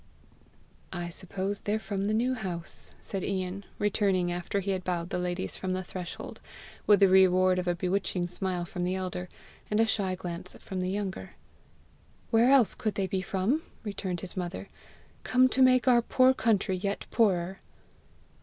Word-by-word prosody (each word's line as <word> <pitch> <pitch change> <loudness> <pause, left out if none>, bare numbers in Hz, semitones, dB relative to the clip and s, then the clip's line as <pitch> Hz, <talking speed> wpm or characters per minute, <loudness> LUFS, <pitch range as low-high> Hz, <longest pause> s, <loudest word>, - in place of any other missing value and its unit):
"I 175 -1 -4
suppose 190 +3 -4
they're 210 +1 0
from 200 -2 -3
the 210 - +1
New 245 +3 +2
House!" 180 -8 -6
said 195 -2 -3
Ian, 190 0 -3
returning 195 -4 +1
after 175 +3 -2
he 195 +1 -2
had 185 -1 -2
bowed 175 -1 -2
the - - -1
ladies 180 +1 -3
from 185 -1 -2
the 185 0 -2
threshold, 180 -1 -7 0.5
with 205 -1 +6
the 195 - +8
reward 185 -1 +5
of 180 - -3
a 175 - +2
bewitching 185 0 -1
smile 180 0 -1
from 175 +1 -4
the 180 +1 0
elder, 180 -1 -4 0.4
and 210 - +1
a 225 - +5
shy 195 -4 0
glance 180 0 -6
from 190 - -6
the 185 0 -1
younger. 195 -1 -4 1.0
"Where 230 +2 +5
else 265 -5 +5
could 215 -2 -2
they 195 - 0
be 190 0 -1
from?" 210 - 0 0.2
returned 190 -4 -4
his 185 - -4
mother; 180 +1 -4 0.3
" - - -30
come 255 0 +6
to 265 - +1
make 255 0 +5
our 240 -2 +6
poor 255 +2 +4
country 210 -6 +1
yet 200 +2 -3
poorer!" 190 -4 +2
190 Hz, 175 wpm, -29 LUFS, 180-210 Hz, 1.0 s, the